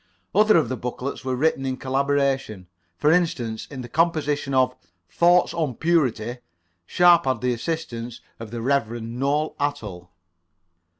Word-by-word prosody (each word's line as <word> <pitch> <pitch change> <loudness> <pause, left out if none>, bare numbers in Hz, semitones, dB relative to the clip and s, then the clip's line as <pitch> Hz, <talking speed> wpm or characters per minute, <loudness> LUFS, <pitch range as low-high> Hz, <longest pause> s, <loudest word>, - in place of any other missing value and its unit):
Other 215 0 +5
of 155 - +2
the 130 - -3
booklets 125 +3 -5
were 130 -1 -1
written 140 +1 +1
in 130 -1 -2
collaboration. 135 -6 -1 0.3
For 150 - +3
instance, 130 -11 0
in 140 -3 -8
the 120 - -8
composition 150 -1 0
of 130 -1 +3 0.3
"Thoughts 175 - +3
on 155 -7 -2
Purity," 125 -8 0 0.5
Sharper 175 -5 +5
had 115 - -12
the 125 0 +1
assistance 120 -4 -4 0.2
of 115 -1 -8
the 115 0 -5
Reverend 120 -3 -1
Noel 145 +3 0
Atall. 105 -12 -4
135 Hz, 140 wpm, -23 LUFS, 120-155 Hz, 0.5 s, Other